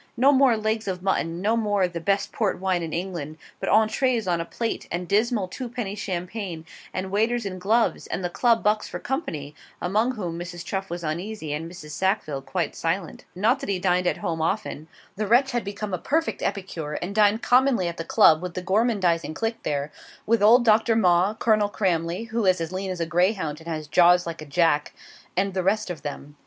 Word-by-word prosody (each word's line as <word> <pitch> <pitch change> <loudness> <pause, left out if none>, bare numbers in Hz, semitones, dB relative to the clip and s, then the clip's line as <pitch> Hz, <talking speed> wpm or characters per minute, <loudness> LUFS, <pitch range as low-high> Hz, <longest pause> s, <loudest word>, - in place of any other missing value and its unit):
No 265 +4 +6
more 265 -4 +4
legs 215 0 -1
of 185 -1 -3
mutton, 170 -3 -1
no 220 +3 +2
more 205 -3 +1
of 180 -1 0
'the 170 - -3
best 200 +4 0
port 210 -5 -1
wine 185 -2 0
in 165 -1 -4
England;' 170 -4 -4 0.2
but - - -2
ENTREES 220 +1 +2
on 170 -2 +1
plate, 230 -1 -3
and 175 +1 -3
dismal 210 0 +1
twopenny 235 -1 -5
champagne, 185 -3 -5 0.3
and 190 +1 -4
waiters 225 +3 +1
in 185 -2 -5
gloves, 220 +5 +1
and 190 - -3
the - - +1
Club 230 +3 +2
bucks 210 +1 +1
for - - -5
company 165 - -4 0.3
among 215 +8 +1
whom 175 -6 -4
Mrs. 175 0 -7
Chuff 195 0 -3
was 175 0 -5
uneasy 165 0 -4
and 160 +3 -4
Mrs. 155 -4 -10
Sackville 155 -5 -1
quite 170 +2 -3
silent. 165 0 -3
Not 225 +9 +2
that 275 - -6
he 195 - +1
dined 180 0 +1
at - - +1
home 165 -1 -1
often. 160 -3 -2 0.3
The 215 0 -1
wretch 255 +5 +4
had 240 -2 -1
become 200 0 -5
a 180 - -1
perfect 320 - -1
epicure, 185 -6 -3
and 180 +5 -4
dined 210 +1 +3
commonly 250 -7 +3
at 170 - -5
the 165 - -3
Club 160 -1 +5
with 180 -1 -6
the 185 - -4
gormandising 190 -6 +1
clique 225 0 -2
there; 145 0 -2 0.3
with 230 -1 +2
old 235 +4 +6
Doctor 220 +1 +4
Maw, 185 0 +3
Colonel 215 -2 +2
Cramley 180 +1 -1
(who 225 -2 0
is 185 -1 +4
as 165 0 -3
lean 190 +1 -3
as 180 -2 -4
a - - +1
greyhound 170 -2 0
and 165 - -14
has 155 -2 -3
jaws 175 +3 +5
like 165 -2 -6
a - - -7
jack), 150 0 +2 0.4
and 195 +1 +1
the 185 - 0
rest 200 +1 0
of 165 - -7
them. 145 -1 -7
190 Hz, 210 wpm, -25 LUFS, 170-220 Hz, 0.4 s, No